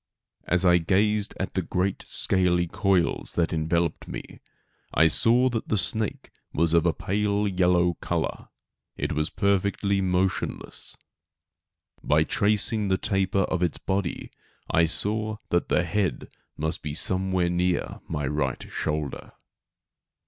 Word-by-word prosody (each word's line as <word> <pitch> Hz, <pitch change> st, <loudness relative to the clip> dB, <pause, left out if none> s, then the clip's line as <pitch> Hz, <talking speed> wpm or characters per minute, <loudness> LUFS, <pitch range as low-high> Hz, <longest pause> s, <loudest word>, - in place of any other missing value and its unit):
As 90 Hz, +2 st, +1 dB
I 90 Hz, -1 st, +5 dB
gazed 105 Hz, +4 st, +1 dB
at 95 Hz, -, -3 dB
the 95 Hz, -, 0 dB
great 90 Hz, +2 st, -2 dB
scaly 90 Hz, -2 st, +1 dB
coils 95 Hz, 0 st, 0 dB
that 85 Hz, -1 st, 0 dB
enveloped 85 Hz, +1 st, -1 dB
me, -, -, -8 dB, 0.6 s
I 80 Hz, -, +5 dB
saw 120 Hz, +10 st, +4 dB
that 115 Hz, -3 st, -3 dB
the 110 Hz, -, +1 dB
snake 110 Hz, +2 st, -1 dB, 0.2 s
was 85 Hz, +1 st, +2 dB
of 85 Hz, 0 st, +4 dB
a -, -, +4 dB
pale 105 Hz, +4 st, -1 dB
yellow 90 Hz, -2 st, +2 dB
color. -, -, -3 dB, 0.5 s
It -, -, -2 dB
was 75 Hz, +1 st, 0 dB
perfectly 100 Hz, 0 st, 0 dB
motionless. 95 Hz, 0 st, -2 dB, 1.1 s
By -, -, +3 dB
tracing 105 Hz, +1 st, +1 dB
the 95 Hz, -1 st, +2 dB
taper 95 Hz, -1 st, 0 dB
of 90 Hz, 0 st, -2 dB
its 90 Hz, -3 st, 0 dB
body 95 Hz, -2 st, -3 dB, 0.4 s
I 80 Hz, 0 st, +4 dB
saw 110 Hz, +5 st, 0 dB
that 85 Hz, -, 0 dB
the 90 Hz, -, +2 dB
head 95 Hz, +1 st, -2 dB, 0.3 s
must 80 Hz, +2 st, -2 dB
be 75 Hz, -1 st, -5 dB
somewhere 95 Hz, 0 st, +1 dB
near 90 Hz, 0 st, -1 dB
my 75 Hz, -1 st, -2 dB
right 75 Hz, +2 st, -2 dB
shoulder. 75 Hz, -3 st, -3 dB
90 Hz, 135 wpm, -25 LUFS, 85-100 Hz, 1.1 s, I